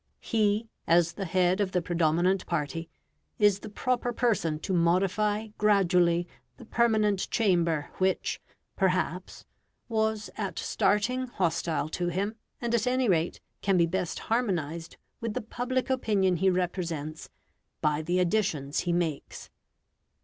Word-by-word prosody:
He, 215 0 +1 0.2
as 170 0 +4
the 195 - -4
head 185 +2 +2
of 190 -2 -1
the 180 - +2
predominant 175 +3 +1
party, 165 0 -2 0.5
is 205 -2 +4
the 215 - -8
proper 245 +3 -1
person 220 -10 +1
to 190 - -2
modify 195 +5 +1
gradually 180 -4 +3 0.3
the 240 - -12
permanent 215 -4 +2
chamber 170 -8 +1
which, 190 0 0 0.3
perhaps, 185 -1 -1 0.4
was 220 -2 -1
at - - -3
starting 250 +5 +1
hostile 170 -7 -1
to 175 +2 -2
him; 195 +5 -1 0.3
and, 235 -1 -2
at 235 +1 +1
any 255 0 +2
rate, 170 -3 +1 0.2
can 195 -1 +2
be 170 - +5
best 175 0 -2
harmonised 170 -9 -2 0.2
with 230 -2 -4
the - - 0
public 250 +3 -2
opinion 200 -8 +2
he 190 +3 +3
represents 170 -4 -2 0.5
by 150 -1 +1
the 175 +3 0
additions 170 -7 0
he 175 - -1
makes. 165 -4 -3
185 Hz, 135 wpm, -28 LUFS, 170-215 Hz, 0.5 s, be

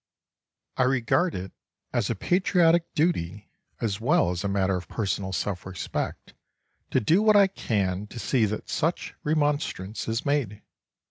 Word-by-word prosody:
I 130 - +4
regard 135 +7 +1
it 95 +1 -5 0.4
as - - 0
a - - 0
patriotic 175 -2 +2
duty, 105 - -1 0.3
as 110 -2 -2
well 105 -6 +3
as 90 +1 -3
a - - 0
matter 95 -1 +1
of 90 -1 -5
personal 100 -3 -2
self 95 0 -2
respect, 95 -2 -5 0.6
to - - +2
do 165 - +3
what 215 -1 +5
I 200 -1 +8
can 105 - -1
to 115 - -11
see 120 -1 +2
that 105 +1 -4
such 165 +2 -1
remonstrance 145 -9 -1
is 115 +1 -2
made. 140 -8 -1
110 Hz, 150 wpm, -26 LUFS, 95-155 Hz, 0.6 s, I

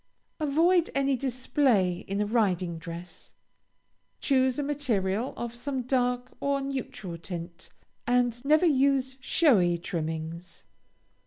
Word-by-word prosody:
Avoid 330 +4 +3
any 275 0 +2
display 250 -7 +1
in 200 +2 -1
a - - +1
riding 185 -6 0
dress. 170 +1 -9 0.9
Choose 260 -2 +2
a 290 - 0
material 245 -6 0
of 235 -1 -4
some 260 +2 -3
dark 250 0 0
or 280 0 0
neutral 260 -10 -5
tint, 170 0 -7 0.4
and 245 0 +1
never 305 +5 +4
use 270 -3 +2
showy 210 - +3
trimmings. 165 0 -5
245 Hz, 110 wpm, -28 LUFS, 180-275 Hz, 0.9 s, never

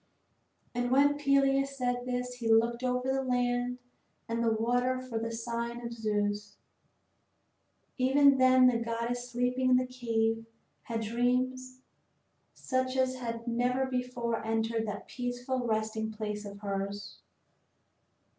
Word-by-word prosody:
And 245 0 -1
when 285 +3 +4
Peleus 275 -1 +2
said 245 -1 -1
this 250 0 -2
he 230 -2 0
looked 235 +2 +3
over 250 +1 0
the 270 - +1
land 245 -1 0 0.5
and 230 +1 -1
the 230 - +3
water 245 +3 +1
for 240 -3 -4
a 230 - -2
sign 235 +1 -3
from 235 -1 -6
Zeus. 210 -2 -2 1.4
Even 275 +1 +5
then 255 0 +6
the 245 -2 +4
goddess 235 +1 -3
sleeping 250 +1 +1
in 255 - +6
the 255 - +1
cave 225 -3 -1 0.4
had 230 -1 -3
dreams 255 +3 -1 0.7
such 260 0 -1
as 260 0 +1
had 230 -1 -5
never 250 +2 +1
before 250 -3 -2
entered 225 0 0
that 205 -1 -5
peaceful 245 0 -3
resting 220 0 -1
place 210 -1 -4
of 200 0 -9
hers. 200 0 -4
245 Hz, 130 wpm, -30 LUFS, 225-255 Hz, 1.4 s, then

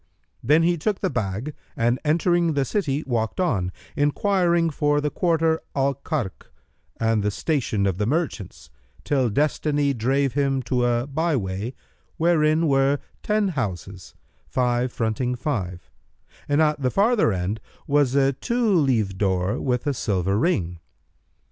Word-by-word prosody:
Then 150 +7 +4
he 170 0 +2
took 205 +5 -1
the 190 - 0
bag 105 +9 -3 0.2
and 120 +2 +1
entering 170 +2 +2
the 140 -2 +1
city 150 -5 -1
walked 115 -1 -2
on, 100 - 0 0.2
enquiring 170 +2 +2
for 145 0 +1
the 145 0 -1
quarter 165 -2 +1
Al 140 0 +2
Karkh 135 - -4 0.5
and 115 -1 +2
the 105 - +1
station 115 -4 -1
of 95 -1 -1
the 105 - 0
merchants, 140 - -3 0.3
till 130 -4 +1
Destiny 145 +3 +1
drave 135 +3 0
him 135 -2 0
to 125 +1 0
a 120 0 +1
by 160 +3 0
way, 100 +2 -3 0.4
wherein 160 -1 +3
were 135 0 +3 0.2
ten 210 -1 +1
houses, 95 - -5 0.3
five 125 0 0
fronting 120 +2 -1
five, 100 - -4 0.6
and 145 +2 +4
at 150 -2 +1
the 130 - +2
farther 205 - +3
end 95 +3 -2 0.3
was 140 -2 +2
a 135 0 +3
two 235 - 0
leaved 115 - +1
door 95 -1 0
with 125 0 -1
a 145 - +1
silver 100 -6 0
ring. 90 - 0
135 Hz, 145 wpm, -23 LUFS, 110-155 Hz, 0.6 s, Then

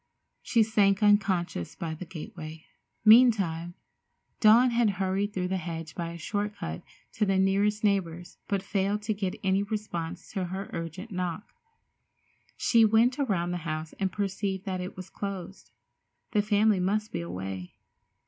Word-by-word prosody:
She 230 -2 +3
sank 205 -2 +2
unconscious 190 - +2
by 165 -1 -4
the 165 +3 -8
gateway. 155 -1 -8 0.4
Meantime, 195 -8 +5 0.6
Dawn 235 +3 +6
had 235 -2 +3
hurried 195 +2 0
through 180 -2 -2
the 190 - 0
hedge 165 -2 -6
by 170 -1 -4
a 170 - -7
short 205 +5 -3
cut 80 0 -5 0.3
to 215 - 0
the 195 -2 +2
nearest 200 +3 +2
neighbor's, 175 -4 -1
but 195 -2 -1
failed 200 +1 -1
to 215 +1 0
get 195 -3 -3
any 190 0 +2
response 205 -6 -4
to 190 -3 -2
her 190 +2 -5
urgent 165 +6 -6
knock. 180 +2 -4 1.0
She 230 -2 +4
went 225 +5 +4
around 185 -10 0
the 180 - -1
house 155 -1 -4
and 190 -2 0
perceived 195 -1 -2
that 185 -2 -2
it 180 +1 -7
was 185 0 -9
closed. 195 -2 -6 0.6
The 210 - +3
family 210 -1 +3
must 210 +4 0
be - - -3
away. 90 +1 -6
195 Hz, 155 wpm, -28 LUFS, 175-210 Hz, 1.0 s, Dawn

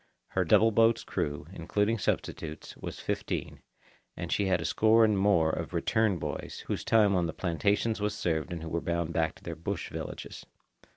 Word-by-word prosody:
Her 95 - +1
double 105 +6 +5
boat's 115 +1 +4
crew, 75 0 -3
including 105 +6 0
substitutes, 80 -3 -3
was - - -7
fifteen, - - -3 0.6
and - - -5
she 100 - +1
had 90 -2 +2
a 80 - -4
score 110 +5 +5
and 110 -1 +2
more 95 -5 +3
of 85 +2 -4
"return" 110 +3 +2
boys, - - -5
whose - - -3
time 105 -3 +4
on 90 -2 +2
the 80 - -4
plantations 105 +5 0
was 105 0 0
served 80 0 -1
and 85 -2 -5
who 80 - -5
were 85 +1 -1
bound 85 -1 -1
back 80 -2 0
to - - -19
their 85 - -5
bush 80 - -4
villages. - - -6
90 Hz, 185 wpm, -29 LUFS, 80-105 Hz, 0.6 s, double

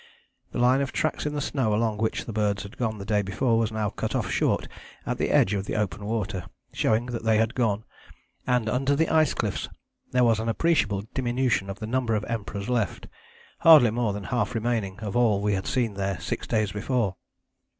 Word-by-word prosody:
The - - -5
line 125 +3 +4
of 135 - -2
tracks 155 -1 -1
in 150 - -3
the 145 - -1
snow 115 -7 0
along 110 -1 0
which 110 0 -1
the 115 - -6
birds 105 -2 0
had 100 +5 -10
gone 110 -3 -2
the 100 - -7
day 105 -1 +2
before 115 +4 +1
was 115 -1 0
now 110 -2 -1
cut - - -3
off - - -1
short - - +1 0.4
at - - -2
the - - 0
edge 95 - +4
of 100 -1 -2
the - - -2
open 105 -1 -2
water, 105 -4 -2 0.3
showing 110 +2 +1
that 120 -2 -5
they 110 -1 +3
had 110 +2 +1
gone, 110 -4 0 0.6
and 125 -3 +2
under 135 +5 +1
the 160 +3 +2
ice 155 -3 +3
cliffs - - -2 0.4
there 125 0 +3
was 115 -2 +3
an 115 +1 -1
appreciable 110 -7 +1
diminution 125 -6 0
in 95 - -4
the - - -4
number 120 -1 0
of 105 - -1
Emperors 105 -3 -4
left, 115 -8 -1 0.5
hardly 150 -9 +8
more 115 -1 0
than 100 0 -5
half 125 +2 -1
remaining 110 -4 -1
of 105 -3 -4
all 120 -4 +4
that 100 - -3
we 105 - +2
had 95 0 -2
seen 120 -5 0
there 95 -2 -2
six - - -4
days 110 -3 +1
before." 105 -2 -1
110 Hz, 215 wpm, -26 LUFS, 105-125 Hz, 0.6 s, hardly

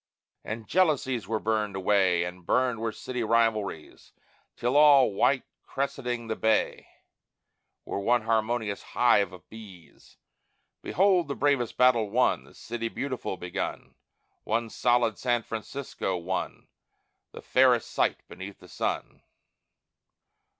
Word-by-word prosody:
And 110 0 -6
jealousies 140 - +1
were 110 +1 0
burned 105 -3 -1
away, 95 -2 +2
And 90 +1 -7
burned 125 +4 +1
were 115 0 -2
city 125 +2 -5
rivalries, 110 -7 -1 0.4
Till 125 +3 -1
all, 140 -6 +6
white 135 +6 +2 0.2
crescenting 125 -3 -3
the 110 - -2
bay, 110 0 0 1.0
Were - - -3
one 120 +3 +2
harmonious 110 -1 -1
hive 100 -6 +2
of 90 -1 -14
bees. 95 -9 -14 0.6
Behold 185 -3 +2
the 140 - -3
bravest 140 -5 0
battle 120 -4 +4
won! 125 +5 +1
The - - -19
City 115 0 -5
Beautiful 130 -7 -4
begun: 90 0 -5 0.5
One 115 +1 -1
solid 120 -3 +1
San 120 -2 0
Francisco, 115 -4 -4
one, 90 +2 -4 0.6
The - - -11
fairest 125 -3 +3
sight - - 0
beneath 95 +2 -9
the 90 - -17
sun. - - -3
115 Hz, 120 wpm, -27 LUFS, 100-125 Hz, 1.0 s, all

